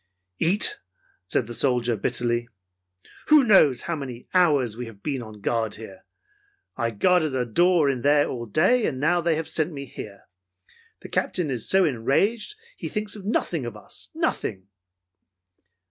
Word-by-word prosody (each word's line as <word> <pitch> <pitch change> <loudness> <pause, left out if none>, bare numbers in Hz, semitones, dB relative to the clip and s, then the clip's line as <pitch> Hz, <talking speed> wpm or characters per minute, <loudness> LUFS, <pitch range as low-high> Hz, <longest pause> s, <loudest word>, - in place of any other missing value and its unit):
"Eat?" 190 +6 +2 0.5
said 115 - 0
the 120 - -8
soldier 120 -2 +1
bitterly. 120 +2 -1 0.8
"Who 305 -2 +7
knows 170 - +4
how 170 - -2
many 130 -5 -7
hours 145 - +3
we 120 0 -6
have 100 -3 -14
been 140 -4 -2
on 110 -3 -11
guard 110 -1 -1
here? 105 -4 -12 0.7
I 115 - -1
guarded 155 - +2
a 125 -1 0
door 170 +6 +3
in 130 -3 0
there 145 +2 +3
all 120 -2 -5
day, 190 - +3
and 130 - -3
now 175 +5 +2
they 165 -1 +1
have 160 0 -3
sent 160 +1 +1
me 140 -2 -7
here. 100 -5 -10 0.8
The - - -10
Captain 165 -6 -1
is 120 -4 -3
so 190 -1 +5
enraged 165 - 0
that 470 +2 -24
he - - -5
thinks 210 -1 -3
nothing 190 - -2
of 120 -3 -6
us, - - -12
nothing!" 95 +1 -2
140 Hz, 160 wpm, -24 LUFS, 120-175 Hz, 0.8 s, Who